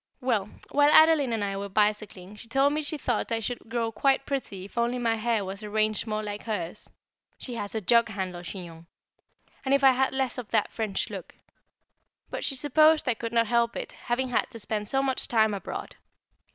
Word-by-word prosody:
Well, 225 -6 0 0.2
while 290 0 +5
Adeline 315 -4 +6
and 225 -2 -1
I 200 -1 -2
were 200 0 -5
bicycling, 210 -1 -1
she 220 +2 -11
told 270 +4 +3
me 305 - 0
she 305 +1 -3
thought 245 -5 -1
I 225 - +1
should 225 +1 -5
grow 230 -1 -1
quite 270 +4 +2
pretty 205 -9 -4
if 200 - -14
only 235 +1 +1
my 235 -2 +1
hair 225 -2 0
was 195 +2 -6
arranged 215 +1 -1
more 215 0 -2
like 205 0 -5
hers 205 -4 -4 0.5
she 250 - -7
has 205 -2 -5
a 220 - -1
jug 235 +4 +4
handle 185 -4 -4
chignon 170 -2 -9 0.8
and 275 0 +3
if 275 - 0
I 270 - +8
had 265 +1 +1
less 265 -2 -1
of 240 - -7
that - - +1
French 215 -4 -2
look. - - -8 1.0
But - - -4
she 275 - 0
supposed 305 +3 +4
I 250 - +3
could 230 0 -5
not 230 -1 +3
help 235 0 +1
it, - - -5
having 250 +2 -2
had 245 - 0
to - - -8
spend 210 -1 -3
so 270 +4 +1
much 265 -1 -1
time 220 -2 +3
abroad. 200 - -6
230 Hz, 205 wpm, -27 LUFS, 210-260 Hz, 1.0 s, I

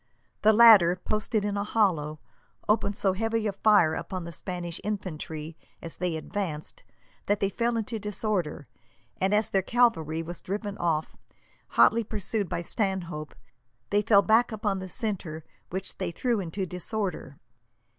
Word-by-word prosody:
The 215 - +6
latter, 210 -6 +8
posted 215 +3 -1
in 205 -1 -1
a 200 - 0
hollow, 170 -9 0 0.5
opened 210 -1 +1
so 195 -2 +1
heavy 225 +2 -1
a 210 - +1
fire 195 -5 +4
upon 185 +2 -4
the 170 - -7
Spanish 175 +1 -6
infantry, 160 -6 -5 0.2
as 165 - -8
they 180 -2 -1
advanced, 160 -2 -5 0.5
that 205 0 +2
they 195 - +1
fell 235 +3 0
into 225 0 -3
disorder; 200 -8 -2 0.5
and 190 +1 +1
as 210 0 +2
their 195 - +3
cavalry 180 -9 +1
were 170 +2 -6
driven 205 +1 -4
off, 160 -2 -1 0.6
hotly 230 +1 +6
pursued 210 -2 -2
by 170 - -3
Stanhope, 175 - -3 0.6
they 205 +1 +3
fell 205 -2 +5
back 225 +3 +4
upon 205 -3 -1
the 185 0 -7
centre, 175 -7 -2 0.3
which 190 +2 -5
they 185 -2 -1
threw 235 +6 -1
into 190 +1 -3
disorder. 180 - -4
195 Hz, 150 wpm, -27 LUFS, 170-215 Hz, 0.6 s, latter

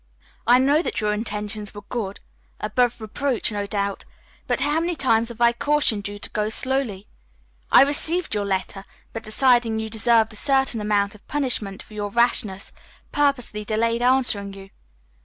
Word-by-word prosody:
I 245 +1 +7
know 280 +4 +3
that - - -3
your 210 -2 0
intentions 210 -1 -4
were 205 - -8
good, 205 -2 -5 0.4
above 245 -2 0
reproach, 240 +3 -1
no 205 -1 -3
doubt, 200 -1 -2 0.4
but - - 0
how 295 +4 +2
many 340 +1 -1
times 235 -5 +2
have 235 -1 -9
I 235 0 +5
cautioned 235 -6 +1
you 205 0 -7
to - - -6
go 210 0 -1
slowly? 235 -5 -2 0.7
I - - +9
received 315 +4 0
your 205 -1 0
letter, 195 0 -3 0.3
but, 225 - -4
deciding 235 0 +2
you 220 0 -4
deserved 225 0 +2
a - - -8
certain 265 -3 +1
amount 205 -1 +1
of 210 - -18
punishment 245 -9 -1
for - - -17
your 205 -1 -3
rashness, 210 -3 0 0.4
purposely 275 -7 0
delayed 230 +2 0
answering 245 -6 +2
you. 195 0 -12
225 Hz, 165 wpm, -23 LUFS, 205-260 Hz, 0.7 s, I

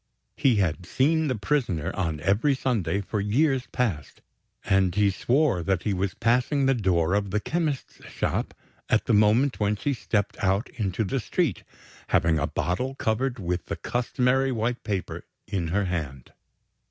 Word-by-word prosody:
He 130 -4 +3
had 90 -3 0
seen 160 +4 +2
the 130 - 0
prisoner 110 - -1
on 80 -5 -2
every 105 - +2
Sunday, 100 -9 0
for 100 +1 -3
years 130 +5 +1
past; 95 - -2 0.4
and 95 -3 +2
he 100 -1 +3
swore 125 - +1
that 95 0 0
he 105 - 0
was 95 0 -2
passing 125 +4 +2
the 135 - +4
door 90 -7 +1
of 100 -1 0
the 105 +3 0
chemist's 155 +1 -3
shop, - - -2 0.3
at - - +2
the - - +1
moment 110 +6 +3
when 105 0 +1
she 140 +7 -1
stepped 100 -6 -2
out 95 +3 +1
into 105 -1 -2
the 130 +7 -1
street, 135 - -1 0.5
having 80 -1 +2
a 75 - 0
bottle 95 - -2
covered 125 +2 -1
with 90 -3 -3
the - - -3
customary 125 +2 0
white 120 +1 -2
paper 100 -4 -3 0.2
in 95 -5 -2
her 100 +5 0
hand. 75 -8 -4
105 Hz, 165 wpm, -26 LUFS, 95-130 Hz, 0.5 s, the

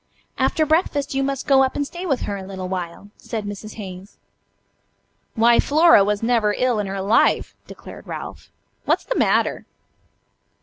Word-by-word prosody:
"After 315 - +2
breakfast 300 -3 0
you 270 - 0
must 275 -1 -2
go 270 -1 +5
up 265 -1 +1
and 285 - -1
stay 350 +5 -7
with 275 -6 0
her 205 - -3
a 195 - -6
little 190 -1 -6
while," 180 +2 -6
said 220 -3 -5
Mrs. 205 +1 -7
Hayes. 190 -1 -9 1.2
"Why, 235 +1 +4
Flora 310 -7 +5
was 205 +1 -1
never 225 -3 +2
ill 250 -3 +1
in 205 - -2
her 195 0 -4
life," 210 +4 +2
declared - - -12
Ralph; - - -8 0.4
"what's - - +1
the - - -2
matter?" - - +1
225 Hz, 165 wpm, -21 LUFS, 200-275 Hz, 1.2 s, go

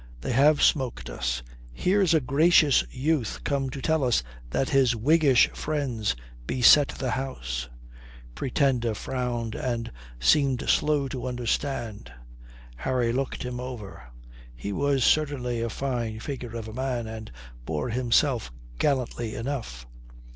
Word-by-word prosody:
They - - -3
have 145 +4 +4
smoked 120 - +1
us. - - -2 0.3
Here's 185 - +2
a - - +5
gracious 150 +2 +4
youth 135 -3 -1
come 135 -2 -1
to 130 +1 -7
tell 160 -2 +2
us 120 - +2 0.3
that 130 - 0
his 130 -4 +3
Whiggish 140 +2 +4
friends 130 - -2 0.3
beset 135 +3 +6
the 130 -2 -3
house." - - -4 0.6
The - - -20
Pretender 125 - 0
frowned 120 -2 -3
and 120 -2 -3 0.3
seemed 130 - +3
slow 150 -2 +2
to 130 -1 -4
understand. 120 - -3 0.7
Harry 120 - 0
looked 135 +1 -2
him 125 -1 -4
over. 125 -6 -7 0.5
He 100 +12 -5
was 140 +1 +1
certainly 130 -6 +1
a 115 - -1
fine 120 -3 -3
figure 120 -2 -6
of 110 -1 -6
a 110 - -8
man, 125 -1 -2
and 110 0 -8 0.3
bore 75 - -3
himself 120 - +1 0.3
gallantly 125 -5 -1
enough. 115 - -5
125 Hz, 135 wpm, -26 LUFS, 115-140 Hz, 0.7 s, beset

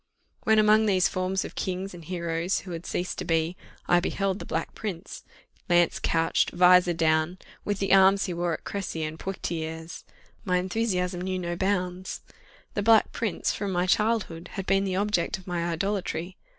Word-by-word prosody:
When 220 -1 +4
among 215 +1 +5
these 185 -3 +4
forms 185 +1 -1
of - - -8
kings 190 +1 -3
and 175 -1 -10
heroes 170 +1 -2
who 185 - -9
had 170 0 -6
ceased 180 - -3
to - - -2
be, 165 +1 0 0.3
I 175 - +5
beheld 195 +2 -1
the - - -8
Black - - -3
Prince, 195 -5 -6 0.5
lance 175 -1 +3
couched, 165 0 +1
vizor 180 0 +5
down, 160 +2 +2 0.3
with 205 -1 -1
the 195 0 +1
arms 195 +1 +6
he 180 - -3
wore 170 0 -1
at - - -12
Cressy 190 -5 -4
and 155 +1 -5
Poictiers, 160 -3 -5 0.4
my 180 -4 +1
enthusiasm 180 -2 -1
knew 185 0 -2
no 175 -1 -3
bounds. 185 -1 -2 0.5
The 205 - -1
Black 220 +1 +5
Prince, 225 -6 -1
from 200 -2 -3
my 180 0 +1
childhood, 200 -4 0
had 195 -2 -4
been 195 +1 +2
the 190 -1 -1
object 200 -3 0
of 190 - -15
my 175 -2 -2
idolatry. 180 -1 -2
180 Hz, 175 wpm, -27 LUFS, 170-195 Hz, 0.5 s, arms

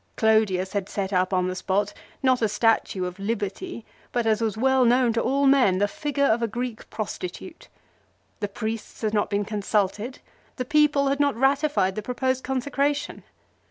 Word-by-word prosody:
Clodius 215 -4 +2
had 200 -1 -2
set 200 -1 -3
up 185 +1 +2
on 185 -1 +1
the 185 - -3
spot, 200 +2 -1 0.3
not 255 -2 +3
a 220 - +2
statue 210 -3 +1
of 180 +1 -6
Liberty, 220 - -4 0.3
but, 240 -2 0
as 220 0 +2
was 220 -2 -1
well 265 +2 +3
known 245 0 +4
to 230 - +1
all 280 +1 +1
men, 265 -9 +5
the 205 +2 +2
figure 285 +5 -1
of 235 -2 +2
a 230 - +1
Greek 240 +1 -5
prostitute. 215 - -6 0.7
The 205 - -1
priests 220 +2 -5
had 215 -1 0
not 205 -2 +1
been 205 0 0
consulted. 210 +3 -1 0.4
The 255 - -3
people 295 0 +3
had 275 +1 0
not 285 -1 +2
ratified 270 -5 +2
the 215 - -4
pro 250 +4 -5
posed 260 0 0
consecration. 280 +2 -1
225 Hz, 180 wpm, -25 LUFS, 205-265 Hz, 0.7 s, men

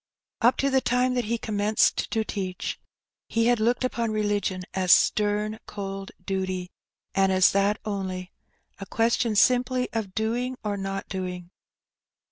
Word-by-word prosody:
Up 240 +2 +4
to 275 0 +1
the 265 0 +3
time 250 +1 +1
that 245 -2 0
he 235 +2 0
commenced 210 -1 +1
to 220 - 0
teach, 190 -4 -4 0.5
he 230 0 +1
had 240 -1 +3
looked 240 +3 +1
upon 235 -2 -1
religion 205 -3 -1
as 185 -2 +1
stem, 210 +1 +3
cold 195 -1 -6 0.2
duty, 185 -2 -2 0.4
and 195 0 +3
as 185 -1 +5
that 200 +1 +2
only; 190 -3 -4 0.5
a 195 - -7
question 230 0 +1
simply 250 +3 +3
of 210 -5 -3
doing 240 +4 -1
or 210 -1 -1
not 195 0 -4
doing. 180 -2 -5
210 Hz, 145 wpm, -26 LUFS, 195-235 Hz, 0.5 s, as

